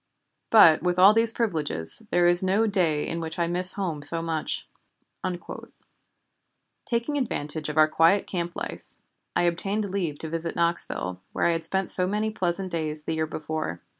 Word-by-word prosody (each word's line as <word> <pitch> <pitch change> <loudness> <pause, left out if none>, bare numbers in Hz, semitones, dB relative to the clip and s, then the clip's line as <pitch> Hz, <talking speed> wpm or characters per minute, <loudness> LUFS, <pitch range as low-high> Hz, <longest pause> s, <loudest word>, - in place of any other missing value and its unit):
But 170 -8 +7
with 180 +1 0
all 190 +3 +8
these 225 0 +4
privileges 155 - -1
there 175 - +3
is 175 0 +4
no 195 +4 +2
day 175 -8 +1
in 170 - -3
which 160 -1 -5
I 170 - +1
miss 180 +2 0
home 175 -7 -3
so 145 +3 -3
much." 160 -2 -3 2.2
Taking 245 +5 -1
advantage 155 - -3
of 150 - -5
our 155 0 +6
quiet 165 +5 +3
camp 175 -1 -4
life, - - -7 0.4
I - - +2
obtained 195 +4 -1
leave 175 -7 -2
to 160 - -6
visit 165 +1 -4
Knoxville, 130 - -1
where - - 0
I 170 - +4
had 165 -1 -2
spent 190 +3 0
so 180 0 +3
many 210 +2 -1
pleasant 185 -2 -2
days 155 -2 -2
the 160 - -3
year 160 0 -1
before. 155 - -4
170 Hz, 170 wpm, -26 LUFS, 160-195 Hz, 2.2 s, all